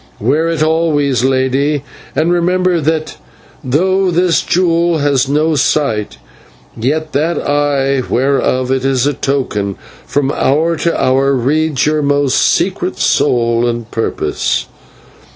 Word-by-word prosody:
Wear 150 +9 +1
it 165 -2 0
always, 150 -6 +1
lady, 135 +2 0 0.3
and 170 +2 +1
remember 180 0 +1
that 155 +1 -2 0.5
though 185 +8 +1
this 175 0 +2
jewel 170 -1 +1
has 140 -2 +1
no 155 +3 +1
sight, 125 - 0 0.6
yet 155 +7 -2
that 160 +4 0
Eye, 140 -2 0
whereof 130 0 0
it 130 -1 0
is 135 -1 +1
a 145 - +1
token, 125 -8 -2 0.3
from 140 -1 0
hour 155 +5 +1
to 170 +2 -1
hour 135 +2 +2
reads 145 +3 0
your 150 0 +1
most 145 -2 +1
secret - - 0
soul 115 -1 +1
and 115 -1 -4
purpose. 115 - -2
145 Hz, 125 wpm, -14 LUFS, 130-160 Hz, 0.6 s, this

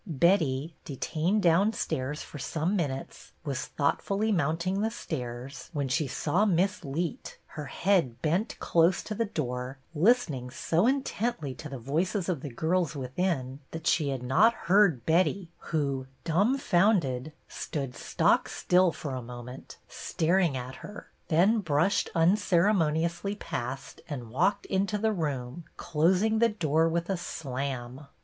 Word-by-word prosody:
Betty, 160 -2 +2
detained 165 +8 -1
downstairs 165 -6 +1
for 145 - -10
some 165 +8 -1
min 170 -7 +1
utes, 135 0 -8
was 135 -3 -3
thoughtfully 200 +9 0
mounting 170 +3 0
the 220 - +1
stairs, 125 - -6
when 140 -3 -1
she 145 +3 +1
saw 160 +9 +1
Miss 190 0 +1
Leet, 160 +4 -4
her 150 -2 -7
head 165 -7 +1
bent 175 - 0
close 170 +2 +3
to 215 - -5
the 230 +2 0
door, 125 - -4 0.2
listening 160 - +2
so 165 - +1
intently 240 - -1
to 150 +3 -9
the 135 - -6
voices 170 - -1
of 165 -7 -1
the 145 - -5
girls 160 +5 0
within 135 -1 -2
that 165 0 -7
she 155 -2 +2
had 135 -2 -3
not 215 - +4
heard 185 - +3
Betty 175 +2 +2 0.2
who, 140 -4 -1 0.2
dumbfounded, 175 - +2 0.2
stood 135 -4 -4
stock - - +2
still 180 -1 +3
for 145 -4 -6
a 130 - -3
moment, 125 +1 -9
staring 170 -3 +1
at 125 +1 -6
her, 205 - -10 0.2
then 190 +8 +4
brushed 170 +1 +1
unceremoniously 175 0 +2
past 130 - -5
and 125 -6 -6
walked 185 - +1
into 195 +2 0
the 220 +1 +1
room, 145 -3 -3
closing 185 +8 +2
the 235 0 +5
door 165 -5 +1
with 170 +1 -1
a 195 - -1
slam. 135 -4 -5
165 Hz, 140 wpm, -28 LUFS, 135-190 Hz, 0.2 s, the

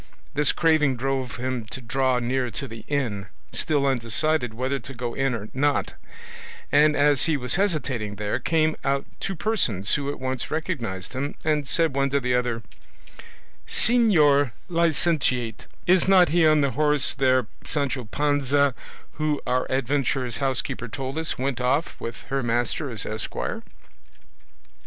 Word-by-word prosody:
This 145 -1 +3
craving 155 -5 +3
drove 130 -1 -2
him 130 -1 -3
to 115 +5 -6
draw 130 +1 +1
near 125 +1 0
to 140 +4 -5
the 115 -2 -9
inn, 115 -10 -2 0.2
still 145 -3 +1
undecided 130 +1 +1
whether 130 +4 -2
to 135 +3 -8
go 120 -1 -4
in 135 -2 0
or 105 -1 -6
not, 145 +2 +1 0.8
and 150 +1 +5
as 145 -1 +4
he 160 -3 +2
was 125 -2 -1
hesitating 140 - -1
there 105 0 -2
came 155 -1 +1
out 140 0 0
two 195 - -3
persons 130 - 0
who 140 -1 0
at 145 - -5
once 130 -1 -3
recognised 120 - -3
him, 140 +2 -3
and 150 -2 +1
said 165 -1 +1
one 140 0 +2
to 140 +1 +1
the 125 -2 -1
other: 120 -2 0 1.0
"Señor 155 - +4 0.2
licentiate, 160 -8 0 0.2
is 185 +1 +4
not 185 -3 +6
he 165 0 +4
on 155 -1 +4
the 140 -1 +1
horse 150 -1 +2
there 130 -2 +2 0.2
Sancho 140 -4 -2
Panza 140 +1 +1 0.5
who, 150 -2 +1
our 125 +1 0
adventurer's 130 -2 0
housekeeper 130 -2 -2
told 135 +3 -5
us, 160 - -1
went 130 -1 -2
off 140 +6 0
with 115 0 -6
her 135 0 0
master 120 +5 -1
as 110 -4 -5
esquire?" 110 0 -3
135 Hz, 150 wpm, -24 LUFS, 125-150 Hz, 1.0 s, not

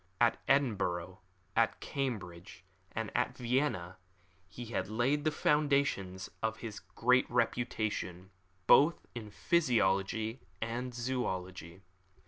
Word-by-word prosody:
At 120 -1 +3
Edinburgh, 95 -9 +1 0.4
at - - +2
Cambridge, 95 -10 -4 0.3
and 115 -1 -3
at 125 +1 0
Vienna 120 -8 0 0.5
he 120 +5 -8
had 115 - -2
laid 130 +7 +1
the - - +5
foundations 140 -12 +1
of 110 0 -1
his 110 -3 -6
great 125 +2 +2
reputation, 110 -6 -1 0.3
both 150 - +5
in 115 -4 -7
physiology 110 - +1 0.2
and 115 +3 -2
in 125 - -6
zoology. 95 -8 -3
115 Hz, 110 wpm, -33 LUFS, 95-130 Hz, 0.5 s, the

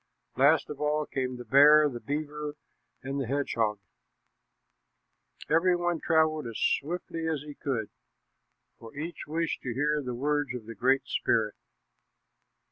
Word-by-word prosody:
Last 145 +5 +4
of 145 0 -8
all 150 0 +1
came 130 -2 -3
the 125 - -9
bear, 150 +5 +7
the 125 -4 -5
beaver, 150 +2 -4 0.5
and 135 +1 -3
the 130 - -3
hedgehog. 115 -6 0 1.7
Every 175 +3 +3
one 175 -1 -1
traveled 155 -4 +2
as 115 - -6
swiftly 165 +1 -1
as 155 -3 -1
he 150 -1 -9
could, 130 -8 -3 0.9
for 115 +3 -12
each 160 +4 -6
wished 165 +2 -2
to 120 -3 -4
hear 150 +2 +1
the 125 -3 -4
words 145 0 -1
of 120 -3 -7
the 115 - -7
Great 130 +5 +2
Spirit. 110 -2 +1
145 Hz, 140 wpm, -28 LUFS, 125-155 Hz, 1.7 s, bear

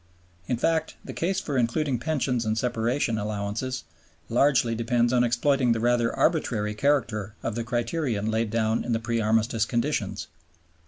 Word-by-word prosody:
In 125 - 0
fact 160 +5 0
the - - -6
case 185 +3 0
for 145 -8 -1
including 125 +2 0
Pensions 130 -4 0
and 110 0 -1
Separation 115 0 0
Allowances 105 +5 -3 0.5
largely 120 -1 +3
depends 120 +1 +1
on 125 -1 +4
exploiting 125 +1 +2
the 115 - -2
rather 120 0 +2
arbitrary 105 -10 +1
character 110 -5 0
of 115 - -2
the 115 +1 -3
criterion 120 -2 -1
laid 110 0 0
down 110 0 0
in 120 - -1
the 115 - +1
pre 115 0 -1
Armistice 110 +1 +2
conditions. 115 -5 -1
120 Hz, 155 wpm, -26 LUFS, 110-130 Hz, 0.5 s, on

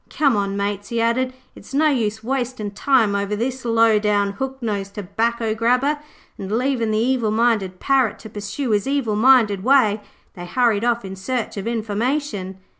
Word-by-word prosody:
Come 280 -6 +2
on, 200 -1 -1
mates,' 200 0 -3
he 235 - -1
added, 235 +3 +1 0.2
'it's 270 - -10
no 310 +2 +4
use 220 -5 -1
wastin' 250 -4 -3
time 225 0 +2
over 200 +1 -1
this 250 +4 -3
low 230 -2 +3
down, 205 -1 +1
hook 265 +6 -4
nosed 200 -4 -4
tobacco 225 +3 -1
grabber.' 250 +6 +1 0.4
And 195 0 -6
leaving 250 -3 0
the 215 - +1
evil 240 -1 +1
minded 215 -5 +1
Parrot 265 -5 +2
to 220 - -10
pursue 210 +5 -4
his 205 +3 +1
evil 270 -6 0
minded 220 -4 +4
way, 225 -5 +3 0.3
they 175 -1 -8
hurried 230 0 +1
off 235 -3 0
in 190 0 -6
search 235 +5 -3
of 200 +1 -5
information. 225 -2 -2
225 Hz, 175 wpm, -21 LUFS, 205-255 Hz, 0.4 s, no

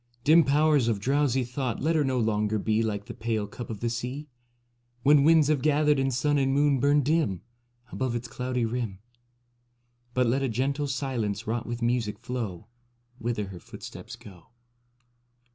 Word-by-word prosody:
Dim 160 +4 +6
Powers 145 -2 +3
of 110 -3 0
drowsy 135 +2 +1
thought, 125 -1 -3
let 160 +4 +1
her 155 - +3
no 130 -2 0
longer 105 -1 +1
be 110 +2 +1
Like 105 -2 -2
the - - -8
pale 110 -2 -2
cup 115 +3 -8
of 110 -3 -6
the 120 - 0
sea, 125 +6 -4 0.8
When 145 +1 +6
winds 160 -1 +5
have 150 -3 +1
gathered 150 0 +3
and 135 0 +1
sun 145 +3 +1
and 135 -1 +1
moon 140 0 +3
burned 145 +1 +3
dim 150 - +1 0.5
Above 130 -2 -2
its 120 +1 -4
cloudy 125 +1 -2
rim; 115 -4 -3 1.2
But 125 0 +3
let 125 +4 +1
a 135 - 0
gentle 135 +5 -1
silence 130 -7 -2
wrought 115 +2 -2
with 120 0 -4
music 120 -3 0
flow 110 -8 -5 0.5
Whither 115 -4 -2
her 90 -2 -9
footsteps - - -10
go. 90 -5 -15
125 Hz, 170 wpm, -27 LUFS, 115-140 Hz, 1.2 s, Dim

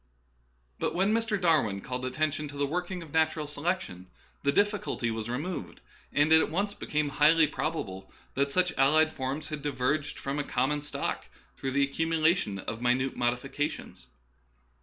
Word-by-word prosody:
But - - -1
when 195 +4 +3
Mr. 225 -2 +1
Darwin 155 - +2
called 125 +4 -4
attention 155 +3 -1
to 145 0 -9
the 140 - +1
working 180 +4 -3
of 155 - -14
natural 160 -1 +2
selection, 145 - -3 0.3
the 140 - +2
difficulty 205 - +1
was 110 0 -4
removed, 155 +9 -4 0.3
and 145 +2 +3
it 160 0 +8
at - - 0
once 200 +6 -1
became 150 -6 -1
highly 155 +3 +5
probable 120 -12 -4 0.2
that 140 +1 0
such 180 +1 +2
allied 155 +4 +5
forms 135 +3 -3
had 150 -2 -4
di 145 - -1
verged 145 +3 -1
from 140 +1 -3
a - - 0
common 140 +3 0
stock 145 - -3 0.3
through 135 -1 -3
the 140 0 +4
accumu 160 +3 -1
lation 155 - +2
of 115 - -4
minute 125 +2 +1
modifications. 125 +5 -2
150 Hz, 165 wpm, -29 LUFS, 130-160 Hz, 0.3 s, it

